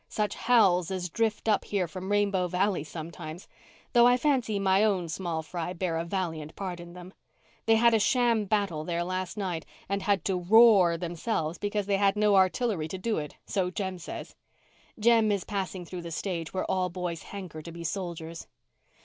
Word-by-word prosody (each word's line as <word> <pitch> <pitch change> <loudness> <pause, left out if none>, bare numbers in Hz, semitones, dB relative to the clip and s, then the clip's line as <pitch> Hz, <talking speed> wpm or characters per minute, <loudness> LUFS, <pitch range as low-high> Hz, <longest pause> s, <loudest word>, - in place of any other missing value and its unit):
Such 210 -1 -1
howls 190 -8 +3
as 185 -2 -3
drift 225 +1 -1
up 215 -2 +3
here 195 -4 -1
from 185 +3 -6
Rainbow 200 -3 +2
Valley 185 -1 0
sometimes! 160 +1 -8 0.5
Though 240 -1 +7
I 245 0 +5
fancy 250 -6 +1
my 195 +1 +3
own 190 -6 +1
small 165 -1 -3
fry 175 +2 -4
bear 180 -2 -2
a 165 - -1
valiant 165 -4 -4
part 185 -3 -5
in 175 0 -10
them. 180 +1 -11 0.5
They 225 - +6
had 235 +1 +5
a 225 - +4
sham 235 -1 +2
battle 195 -7 0
there 170 +1 -1
last 185 +2 -3
night 180 -5 -2 0.2
and 200 +1 -1
had 200 -1 +1
to 190 -2 0
'roar' 195 -3 +6
themselves, 170 -1 -3
because 205 0 -1
they 200 0 +1
had 195 0 +3
no 210 -1 +3
artillery 190 -2 +2
to 190 - -5
do 215 +2 -1
it, 150 -1 -7
so 185 -2 0
Jem 190 0 -4
says. - - -7 0.6
Jem 225 -1 +4
is 200 -2 0
passing 190 -3 -4
through 180 +1 -7
the 170 - -7
stage 165 -1 -3
where 185 - -2
all 185 -1 0
boys 175 -2 -4
hanker 185 -6 -8
to 170 - -9
be 170 0 -8
soldiers." 170 -2 -5
185 Hz, 190 wpm, -28 LUFS, 170-205 Hz, 0.6 s, Though